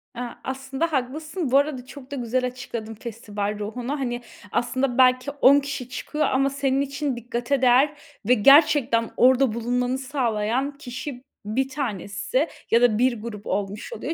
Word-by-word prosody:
Eee, 245 - -4 0.2
aslında 270 +4 -3
haklısın. 305 +3 -2
Bu 270 - +6
arada 280 -3 0
çok 270 0 -12
da - - -3
güzel 250 0 -1
açıkladın, 235 -3 -6
festival 210 -2 -5
ruhunu. 245 +7 -4
Hani, 245 -2 -2 0.3
aslında 250 +1 0
belki 255 +1 +4
10 285 0 +6
kişi 275 -3 -5
çıkıyor 300 +4 -2
ama 270 +1 +2
senin 275 -1 0
için 280 -1 -2
dikkate 240 +3 -2
değer 260 +4 +5 0.3
ve 250 - +6
gerçekten 275 -1 +5
orada 255 -1 +4
bulunmanı 245 +2 -1
sağlayan 260 0 -1
kişi, 255 -1 -7 0.2
bir 260 +6 -1
tanesi 255 - -2 0.2
ya 230 - +5
da 240 -3 +4
bir 240 -2 +1
grup 210 -2 -7
olmuş 205 - -3
oluyor. 330 - -4
255 Hz, 155 wpm, -24 LUFS, 235-275 Hz, 0.3 s, Bu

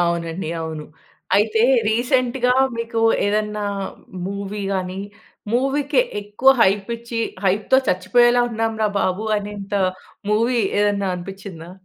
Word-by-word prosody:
అవునండి, 170 0 -1
అవును. 160 -2 -5 0.5
అయితే 220 +2 +2 0.3
రీసెంట్‌గా 250 +2 +1 0.2
మీకు 230 0 -2 0.3
ఏదన్నా 210 0 -1 0.6
మూవీ 200 +1 -5
గాని, 185 0 -3 0.5
మూవీకి 275 - +2 0.2
ఎక్కువ 210 +6 +3
హైప్ 195 +2 +2
ఇచ్చి 235 0 -5 0.2
హైప్‌తో 205 +7 +3
చచ్చిపోయేలా 240 +7 +4
ఉన్నాంరా 225 -1 0
బాబు, 185 +4 -1
అనేంత 205 -1 -8 0.6
మూవీ 230 +3 +2 0.2
ఏదన్నా 200 -1 +1
అనిపించిందా? 180 -2 -9
210 Hz, 100 wpm, -21 LUFS, 195-235 Hz, 0.6 s, చచ్చిపోయేలా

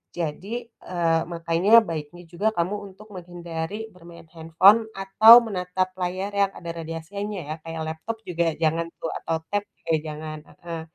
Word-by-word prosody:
Jadi, 195 +9 -4
eee, 170 -7 -1
makanya, 170 +6 +4
baiknya 165 -1 -6
juga, 175 +5 -1
kamu 175 +4 0 0.2
untuk 215 +3 -16
menghindari 175 +4 -6
bermain 170 -2 -14
handphone, 185 +7 +5
atau 215 +5 +8
menatap 185 -2 -2
layar 185 +2 -2
yang 200 -1 +2
ada 170 - -9
radiasinya, 170 +5 -5
ya. 155 - -2
Kayak 165 -1 -5
laptop 220 +8 -6
juga 170 -2 0
jangan, 165 +1 +1 0.2
tuh. 165 - -2
Atau 165 0 -2
tab 205 0 0 0.2
juga 165 - -1
jangan 155 0 -6
heeh. 165 -1 -8
175 Hz, 150 wpm, -24 LUFS, 165-200 Hz, 0.2 s, atau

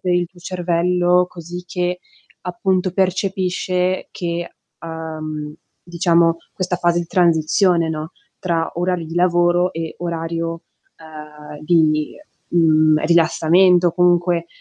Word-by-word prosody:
per 180 - -1
il 175 0 +1
tuo 180 - -21
cervello, 180 0 +1
così 175 +1 -9
che 180 0 -2 0.4
appunto 180 +1 -1
percepisce 185 -1 -1
che 170 -1 -4 0.2
uhm, 155 -2 -6 0.3
diciamo, 170 -1 +2 0.2
questa 185 -1 -2
fase 175 -1 +1
di 170 - -6
transizione, 170 0 +2
no, 160 +2 -5 0.3
tra 165 -3 -1
orari 175 -1 -1
di 165 +1 -8
lavoro 175 0 +2
e 165 -1 -5
orario, 165 -1 -4 0.4
uhm, 150 -1 -11
di, 155 -2 +2 0.4
mhmm, 155 -2 +3
rilassamento 170 +2 +4
o 165 - -4
comunque, 175 -1 +2
175 Hz, 115 wpm, -19 LUFS, 165-180 Hz, 0.4 s, rilassamento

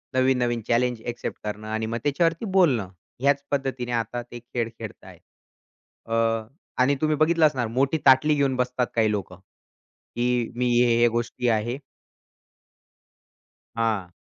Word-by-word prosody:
नवीन-नवीन 125 -2 +2
challenge 120 -1 +1
accept 120 0 -4
करणं 105 0 -5
आणि 110 +1 -2
मग 115 +1 -3
त्याच्यावरती 165 +7 +1
बोलणं, 125 - +3 0.3
ह्याच 140 0 +2
पद्धतीने 130 -3 -2
आता 120 +1 -2
ते 120 0 -10
खेळ 120 -1 -3
खेळतायेत. 110 -3 -10 0.9
अ, 115 - +1 0.7
आणि 140 +2 +3
तुम्ही 155 0 +2
बघितलं 160 +1 +4
असणार 130 -6 -2
मोठी 135 +6 +1
ताटली 140 +3 +6
घेऊन 140 -2 +1
बसतात 125 0 0
काही 110 -2 +3
लोकं, 95 -3 -4 0.8
की 120 -1 0
"मी 125 0 0
हे, 120 -1 +3
हे 120 - +6
गोष्टी 120 +1 -2
आहे." 115 +4 0 2.0
हां. 110 -6 -1
120 Hz, 135 wpm, -25 LUFS, 115-135 Hz, 2.0 s, ताटली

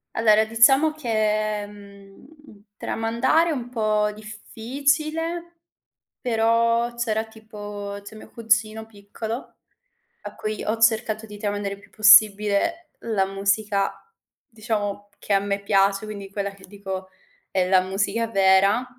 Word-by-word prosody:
Allora, 220 -1 +4
diciamo 270 +8 +4
che, 215 -6 -1
mhmm, 200 -1 -15 0.5
tramandare 235 +11 +1
è - - 0
un 245 -3 -5
po' 215 -3 0
difficile, 290 +10 -3 0.6
però 230 0 +1
c'era 220 -2 -1
tipo 205 -2 -8
c'è 215 - -11
mio - - -13
cugino 220 -1 0
piccolo 220 +3 -8 0.7
a - - -8
cui 215 0 -4
ho 220 +2 -1
cercato 220 -1 +2
di 210 -1 -11
tramandare 205 -1 -3
il 200 - -19
più - - -20
possibile 215 - +4
la 215 -4 0
musica, 200 +1 0 0.5
diciamo, 210 -4 -4
che - - -8
a 195 - +4
me 200 0 -3
piace, 195 +1 +2
quindi 200 -2 -8
quella 200 0 -3
che 195 -1 -16
dico: 190 -1 -7 0.4
"È 185 -1 0
la 190 -1 +5
musica 205 +5 -1
vera." 195 +3 +3
215 Hz, 125 wpm, -23 LUFS, 200-230 Hz, 0.7 s, la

